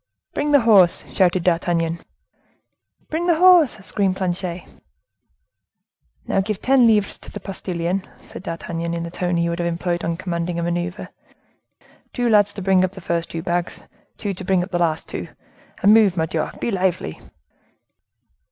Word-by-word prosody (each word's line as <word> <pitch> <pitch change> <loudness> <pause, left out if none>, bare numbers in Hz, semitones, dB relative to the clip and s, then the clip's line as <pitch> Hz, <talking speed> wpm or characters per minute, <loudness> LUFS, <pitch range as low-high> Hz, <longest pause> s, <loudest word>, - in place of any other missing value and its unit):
"Bring 295 0 -1
the 285 -2 +6
horse!" 200 -7 +4
shouted 185 -2 +2
D'Artagnan. 170 -1 0 1.1
"Bring 335 +3 -1
the 340 - +4
horse!" 350 -4 +6
screamed 195 -3 0
Planchet. 180 -1 -3 1.6
"Now 195 - +1
give 205 0 -3
ten 260 -2 +4
livres 210 -3 +2
to - - -11
the 205 - -7
postilion," 185 -1 -3
said - - -11
D'Artagnan, 170 -1 -4
in 170 - -3
the 170 - -6
tone 175 0 -1
he 170 0 +1
would 170 0 -3
have 170 - 0
employed 175 0 -2
in 165 0 -2
commanding 170 -1 -3
a 170 - -1
maneuver; 175 +3 -3 1.0
"two 245 -1 0
lads 205 -2 +4
to 200 - -7
bring 190 -1 +3
up 185 0 -1
the 195 - -9
first 170 -1 -2
two 165 -1 -5
bags, 175 -1 -2 0.3
two 205 -2 -3
to 190 - -9
bring 185 -1 +1
up 190 - -9
the 175 - 0
two - - +3
last,—and 170 +4 -2
move, 210 -5 +4
Mordioux! 160 -1 -1
be 235 - -2
lively!" 185 - -1
180 Hz, 160 wpm, -21 LUFS, 170-205 Hz, 1.6 s, the